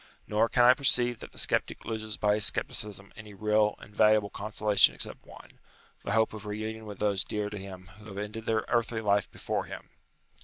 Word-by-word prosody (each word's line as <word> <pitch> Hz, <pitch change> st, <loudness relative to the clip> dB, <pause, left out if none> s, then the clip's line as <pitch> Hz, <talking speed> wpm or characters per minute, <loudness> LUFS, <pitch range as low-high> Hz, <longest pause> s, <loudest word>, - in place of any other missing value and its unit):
Nor 110 Hz, +2 st, +1 dB
can 125 Hz, -, +3 dB
I 125 Hz, +1 st, +8 dB
perceive 125 Hz, -3 st, +2 dB
that -, -, -10 dB
the -, -, -18 dB
sceptic -, -, 0 dB
loses 110 Hz, -1 st, -4 dB
by 105 Hz, -1 st, +2 dB
his 105 Hz, -1 st, +3 dB
scepticism 100 Hz, -1 st, -1 dB
any 105 Hz, -1 st, -11 dB
real 105 Hz, +1 st, +2 dB
and 105 Hz, -, -15 dB
valuable 105 Hz, -2 st, +4 dB
consolation 105 Hz, -1 st, +2 dB
except -, -, -5 dB
one; -, -, -15 dB, 0.4 s
the 100 Hz, -, -2 dB
hope 110 Hz, 0 st, +2 dB
of 110 Hz, -1 st, -8 dB
reunion 110 Hz, +1 st, -5 dB
with 105 Hz, -2 st, -8 dB
those 100 Hz, -3 st, 0 dB
dear 105 Hz, -1 st, -3 dB
to 105 Hz, -, -5 dB
him 95 Hz, -2 st, -10 dB
who 105 Hz, -, -14 dB
have 100 Hz, -2 st, -9 dB
ended 105 Hz, +2 st, -6 dB
their 110 Hz, -1 st, +1 dB
earthly 115 Hz, -1 st, 0 dB
life 100 Hz, -1 st, +1 dB
before -, -, -3 dB
him. -, -, -10 dB
105 Hz, 200 wpm, -29 LUFS, 105-110 Hz, 0.4 s, I